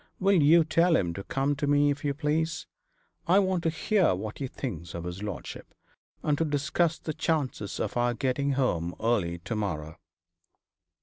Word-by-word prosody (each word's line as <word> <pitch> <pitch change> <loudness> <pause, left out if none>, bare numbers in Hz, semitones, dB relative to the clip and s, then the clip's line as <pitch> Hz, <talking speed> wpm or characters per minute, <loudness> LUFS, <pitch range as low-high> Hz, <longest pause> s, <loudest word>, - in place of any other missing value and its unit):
Will 195 -3 +4
you 160 +3 +6
tell 165 +2 +3
him 85 - +1
to 100 - -6
come 135 +5 0
to 145 -1 -1
me, 145 0 +4
if 145 0 -5
you 140 -1 0
please? 160 +2 -1 0.6
I 180 +3 +5
want 185 -3 +2
to - - +4
hear 170 - +2
what 105 +3 -6
he 135 - -2
thinks 85 - -6
of 85 - -5
his 90 +2 -6
lordship, 105 -3 -7 0.5
and 150 - +2
to - - +3
discuss 155 +2 0
the 155 - -5
chances 140 - -2
of - - -2
our 120 0 +1
getting 135 +3 0
home 90 -11 0
early 105 -7 0
to 100 +7 -5
morrow.' 80 -6 -4
140 Hz, 180 wpm, -28 LUFS, 100-160 Hz, 0.6 s, you